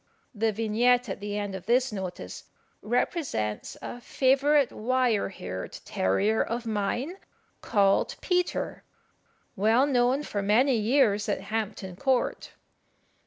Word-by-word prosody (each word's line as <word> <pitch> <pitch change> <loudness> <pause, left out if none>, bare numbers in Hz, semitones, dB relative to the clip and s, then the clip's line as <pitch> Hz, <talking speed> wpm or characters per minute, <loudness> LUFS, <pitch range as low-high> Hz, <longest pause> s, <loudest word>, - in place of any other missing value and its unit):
The 220 0 +1
vignette 230 +3 +2
at 190 - -4
the 205 0 -4
end 205 -1 -3
of 190 0 -7
this 250 +2 +3
notice 190 -3 -6 0.4
represents 215 - -2
a 245 - -6
favourite 275 +2 +3
wire 245 -3 +1
haired 95 - -6
terrier 200 - +1
of 235 +1 -4
mine, 230 - -2 0.4
called 200 -3 +2
Peter, 360 -1 -1 0.7
well 225 +7 +4
known 260 +1 +2
for 205 -8 -3
many 240 +7 +3
years 220 -2 +2
at - - -1
Hampton 205 -4 -4
Court. 265 0 0
225 Hz, 120 wpm, -27 LUFS, 205-255 Hz, 0.7 s, well